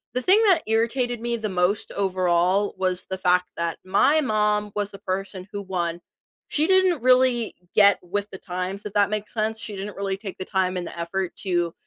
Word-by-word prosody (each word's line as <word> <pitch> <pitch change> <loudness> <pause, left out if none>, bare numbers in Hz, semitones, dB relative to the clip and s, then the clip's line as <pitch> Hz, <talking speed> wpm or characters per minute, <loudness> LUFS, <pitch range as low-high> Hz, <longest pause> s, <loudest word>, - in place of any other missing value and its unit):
The 250 - +1
thing 405 +4 +5
that 375 -4 +5
irritated 235 +1 0
me 235 0 -1
the 215 -2 -3
most, 185 +2 0
overall, 185 0 +1
was 185 -1 -1
the 190 - -4
fact 180 -1 +2
that 170 0 -2
my 285 +11 +3
mom 210 -3 +1
was 205 -1 -2
the 195 - -11
person 190 0 -4
who 205 -1 -4
won. 175 -3 -3 0.5
She 305 +2 +1
didn't 375 -7 +3
really 255 -2 +3 0.2
get 200 -2 +6
with 205 +3 -3
the 190 - -7
times, 185 +3 -5
if 205 - -6
that 205 -1 +3
makes 215 0 -4
sense? 220 0 -1
She 210 -2 -6
didn't 200 +1 -6
really 195 -1 -2
take 195 -3 -8
the 185 - -5
time 185 -2 0
and 175 - -3
the - - -9
effort 175 +2 -3
to 175 -3 -1
200 Hz, 200 wpm, -24 LUFS, 185-220 Hz, 0.5 s, get